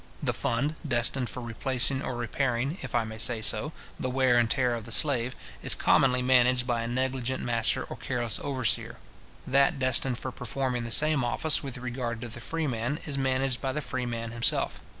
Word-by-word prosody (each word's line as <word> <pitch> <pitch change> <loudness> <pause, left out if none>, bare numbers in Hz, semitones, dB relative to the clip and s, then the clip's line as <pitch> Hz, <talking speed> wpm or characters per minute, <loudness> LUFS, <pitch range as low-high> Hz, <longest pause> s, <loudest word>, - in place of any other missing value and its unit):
The - - 0
fund 135 +6 -1
destined 120 +1 +1
for 125 - -5
replacing 130 +3 +2
or 130 - -4
repairing, 125 - -1
if 130 -3 -5
I 120 - +3
may 110 0 -8
say 120 0 +2
so, 150 +7 +1 0.3
the 130 - -2
wear 130 -1 +3
and 115 -1 +2
tear 125 -1 +1
of 115 -2 -5
the 115 - -9
slave, 130 -1 +2 0.3
is - - +3
commonly 125 -1 +3
managed 125 -1 +4
by 120 -2 0
a 115 - -3
negligent 130 +1 -2
master 115 -2 0
or - - -8
careless 120 -4 -1
overseer. 130 -5 -1 0.5
That 140 +4 +3
destined 130 -1 +2
for 130 - -5
performing 125 0 -3
the - - -5
same 150 +2 +4
office 150 +6 +1
with 135 -4 -5
regard 120 -2 -4
to 120 - -5
the 120 - -8
freeman 140 -3 -2
is 145 - -3
managed 130 -1 0
by 135 -1 -2
the 150 - -1
freeman 120 -4 -4
himself. 115 0 +1
125 Hz, 190 wpm, -28 LUFS, 120-135 Hz, 0.5 s, managed